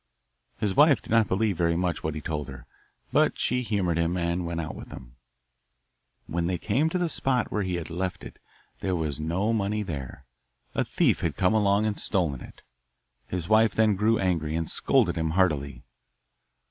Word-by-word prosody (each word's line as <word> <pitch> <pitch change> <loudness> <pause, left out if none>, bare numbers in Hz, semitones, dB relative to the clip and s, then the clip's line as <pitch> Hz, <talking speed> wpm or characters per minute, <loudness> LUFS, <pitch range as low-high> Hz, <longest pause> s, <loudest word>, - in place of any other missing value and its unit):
His 100 -3 -1
wife 145 -2 +6
did - - -12
not 115 -2 +4
believe 100 +1 +1
very 85 0 +2
much 90 -1 -1
what 80 -1 -3
he 75 - -4
told 75 -1 -3
her, 65 -3 -10 0.5
but - - +3
she 125 +1 0
humoured 95 -8 0
him, 85 +2 0
and 85 0 -1
went 85 0 -3
out 80 -1 -4
with - - -9
him. - - -11 1.1
When 85 0 -2
they 90 0 0
came 125 - +1
to 180 - -1
the 175 -1 0
spot 135 -5 0
where 105 - 0
he 95 -2 -2
had 85 -1 -5
left 90 +2 -3
it - - -11 0.4
there 95 -2 -1
was 75 -4 -2
no 90 +8 0
money 105 0 0
there; 70 -6 -7 0.5
a - - +1
thief - - +1
had - - -2
come 90 +4 +3
along 105 -1 +3
and 105 -2 -1
stolen 80 -9 -1
it. - - -13 0.6
His 90 -2 -4
wife 110 0 +4
then 110 -2 +3
grew 110 +3 +2
angry 80 -5 0
and 80 -1 -1
scolded 115 -11 +2
him 80 -1 0
heartily. 70 -8 +1
90 Hz, 190 wpm, -26 LUFS, 80-105 Hz, 1.1 s, wife